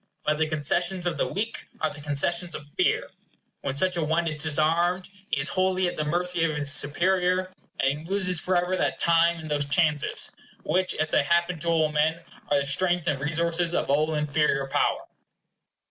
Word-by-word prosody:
But 150 Hz, 0 st, 0 dB
the 160 Hz, -, +2 dB
concessions 175 Hz, +4 st, 0 dB
of 175 Hz, -, -1 dB
the -, -, 0 dB
weak 220 Hz, +3 st, -4 dB
are 155 Hz, -, 0 dB
the 145 Hz, -, -10 dB
concessions 165 Hz, +4 st, 0 dB
of 150 Hz, -, -8 dB
fear. -, -, +1 dB, 0.5 s
When 135 Hz, -1 st, -3 dB
such 180 Hz, +4 st, +1 dB
a 170 Hz, -, 0 dB
one 160 Hz, +2 st, 0 dB
is 155 Hz, -2 st, 0 dB
disarmed, 165 Hz, +4 st, +1 dB, 0.2 s
he -, -, 0 dB
is 140 Hz, -, +1 dB
wholly 185 Hz, 0 st, +1 dB
at -, -, -3 dB
the 155 Hz, -, -2 dB
mercy 175 Hz, +2 st, +1 dB
of 155 Hz, -2 st, 0 dB
his 145 Hz, -1 st, +1 dB
superior; 185 Hz, +5 st, +1 dB, 0.3 s
and 135 Hz, +2 st, +1 dB
he 155 Hz, -, -12 dB
loses 185 Hz, -2 st, +1 dB
forever 180 Hz, 0 st, +1 dB
that -, -, -1 dB
time 170 Hz, 0 st, +3 dB
and 155 Hz, -2 st, -8 dB
those 145 Hz, -1 st, +1 dB
chances, 150 Hz, 0 st, +1 dB, 0.3 s
which, 185 Hz, 0 st, 0 dB
as 155 Hz, 0 st, -1 dB
they -, -, +3 dB
happen 170 Hz, +3 st, +1 dB
to 170 Hz, -, -5 dB
all 160 Hz, -2 st, +2 dB
men, 155 Hz, +2 st, +1 dB, 0.3 s
are 145 Hz, -, +3 dB
the -, -, -3 dB
strength 175 Hz, +5 st, +1 dB
and 140 Hz, -, 0 dB
resources 170 Hz, +3 st, 0 dB
of -, -, 0 dB
all 155 Hz, +2 st, +1 dB
inferior 150 Hz, -2 st, +1 dB
power. 135 Hz, -, 0 dB
165 Hz, 190 wpm, -26 LUFS, 150-180 Hz, 0.5 s, time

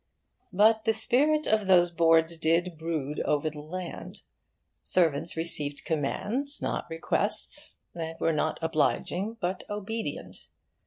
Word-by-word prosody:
But 220 Hz, +3 st, +4 dB
the 225 Hz, -, +3 dB
spirit 290 Hz, +8 st, +2 dB
of 215 Hz, -2 st, +1 dB
those 175 Hz, -2 st, +5 dB
boards 165 Hz, 0 st, +3 dB
did 165 Hz, +1 st, +2 dB
still 180 Hz, -2 st, -8 dB
brood 155 Hz, -3 st, -3 dB
over 150 Hz, +1 st, 0 dB
the 150 Hz, -1 st, -9 dB
land: 175 Hz, +4 st, -7 dB, 0.6 s
servants 165 Hz, -2 st, +2 dB
received 150 Hz, -3 st, -1 dB
commands, 205 Hz, -, -1 dB
not -, -, -3 dB
requests, 165 Hz, 0 st, -1 dB, 0.2 s
and 165 Hz, -1 st, -6 dB
were 165 Hz, -, +1 dB
not 155 Hz, +1 st, 0 dB
'obliging' 180 Hz, +7 st, 0 dB
but 180 Hz, -1 st, -2 dB
obedient. 210 Hz, +2 st, -5 dB
170 Hz, 125 wpm, -28 LUFS, 160-210 Hz, 0.6 s, those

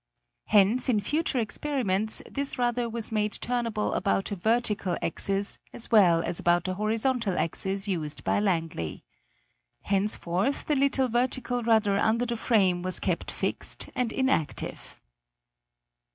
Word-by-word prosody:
Hence 215 Hz, +5 st, +3 dB
in 220 Hz, -4 st, +3 dB
future 295 Hz, +7 st, -1 dB
experiments 220 Hz, -3 st, 0 dB
this 280 Hz, 0 st, -3 dB
rudder 240 Hz, -1 st, 0 dB
was 230 Hz, -1 st, -3 dB
made 210 Hz, -1 st, 0 dB
turnable 230 Hz, -3 st, -1 dB
about 195 Hz, +1 st, 0 dB
a -, -, -1 dB
vertical 210 Hz, -2 st, 0 dB
axis, 195 Hz, +4 st, -2 dB
as 240 Hz, -, -6 dB
well 175 Hz, -7 st, +5 dB
as 170 Hz, -, -2 dB
about 175 Hz, 0 st, +2 dB
the 185 Hz, -, -2 dB
horizontal 220 Hz, 0 st, 0 dB
axis 195 Hz, +4 st, -1 dB
used 155 Hz, -6 st, -3 dB
by -, -, +1 dB
Langley. 165 Hz, -, -2 dB, 0.8 s
Henceforth 195 Hz, +3 st, 0 dB
the 300 Hz, -, +1 dB
little 270 Hz, -1 st, +2 dB
vertical 245 Hz, +1 st, -1 dB
rudder 220 Hz, -3 st, +3 dB
under 230 Hz, +3 st, +2 dB
the 240 Hz, -1 st, -2 dB
frame 195 Hz, -6 st, +2 dB
was 185 Hz, 0 st, -1 dB
kept -, -, -2 dB
fixed -, -, -3 dB
and 245 Hz, -3 st, -1 dB
inactive. 260 Hz, -, -2 dB
215 Hz, 135 wpm, -27 LUFS, 190-245 Hz, 0.8 s, well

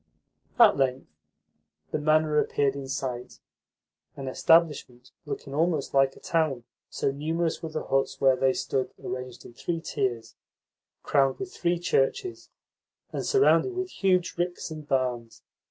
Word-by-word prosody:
At 230 Hz, -4 st, +7 dB
length 135 Hz, -1 st, 0 dB, 0.9 s
the -, -, -1 dB
manor 155 Hz, 0 st, +3 dB
appeared 140 Hz, -2 st, +1 dB
in 140 Hz, -1 st, -6 dB
sight 130 Hz, -2 st, -4 dB, 0.8 s
an 135 Hz, -1 st, -6 dB
establishment 135 Hz, -4 st, +2 dB, 0.2 s
looking 140 Hz, -, -6 dB
almost 155 Hz, -1 st, 0 dB
like 135 Hz, -1 st, +3 dB
a -, -, -14 dB
town, 155 Hz, -7 st, 0 dB, 0.3 s
so -, -, -1 dB
numerous 160 Hz, +4 st, -2 dB
were 160 Hz, -, -5 dB
the 155 Hz, 0 st, -4 dB
huts 135 Hz, 0 st, 0 dB
where 135 Hz, -1 st, +5 dB
they 130 Hz, +1 st, +2 dB
stood 130 Hz, 0 st, -2 dB
arranged 125 Hz, -1 st, -6 dB
in -, -, -12 dB
three 165 Hz, +6 st, -3 dB
tiers, 130 Hz, -8 st, -3 dB, 0.7 s
crowned 135 Hz, -2 st, +2 dB
with 190 Hz, -2 st, -6 dB
three 175 Hz, 0 st, 0 dB
churches, 175 Hz, -, -1 dB, 0.6 s
and -, -, -3 dB
surrounded 400 Hz, -2 st, +3 dB
with 370 Hz, 0 st, -3 dB
huge 185 Hz, -2 st, +1 dB
ricks 175 Hz, -1 st, -2 dB
and 155 Hz, -2 st, -8 dB
barns. 125 Hz, -4 st, -2 dB
145 Hz, 140 wpm, -27 LUFS, 135-170 Hz, 0.9 s, At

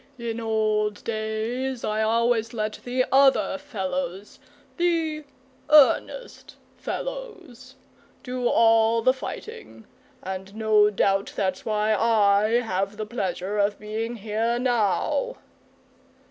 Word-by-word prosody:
In 235 Hz, -1 st, -4 dB
old 215 Hz, -2 st, 0 dB
days 230 Hz, +4 st, -3 dB
I 215 Hz, +1 st, -1 dB
always 230 Hz, +1 st, +1 dB
let 215 Hz, -1 st, -3 dB
the 255 Hz, +1 st, 0 dB
other 275 Hz, +1 st, +4 dB
fellows 190 Hz, -7 st, -5 dB, 0.4 s
the 325 Hz, -3 st, 0 dB, 0.4 s
EARNEST 305 Hz, -, +3 dB, 0.2 s
fellows 395 Hz, -, -7 dB, 0.5 s
do 250 Hz, -1 st, -2 dB
all 225 Hz, 0 st, +4 dB
the 255 Hz, -, +4 dB
fighting, 440 Hz, -, -9 dB, 0.4 s
and 190 Hz, +1 st, -6 dB
no 215 Hz, -1 st, +4 dB
doubt 195 Hz, -1 st, 0 dB
that's 190 Hz, -2 st, -2 dB
why 215 Hz, 0 st, +1 dB
I 215 Hz, +1 st, +3 dB
have 195 Hz, -2 st, -3 dB
the 215 Hz, -, -4 dB
pleasure 200 Hz, -2 st, -3 dB
of 205 Hz, 0 st, +1 dB
being 220 Hz, +3 st, -4 dB
here 225 Hz, +2 st, -1 dB
now." 245 Hz, -, 0 dB
225 Hz, 105 wpm, -24 LUFS, 210-255 Hz, 0.5 s, other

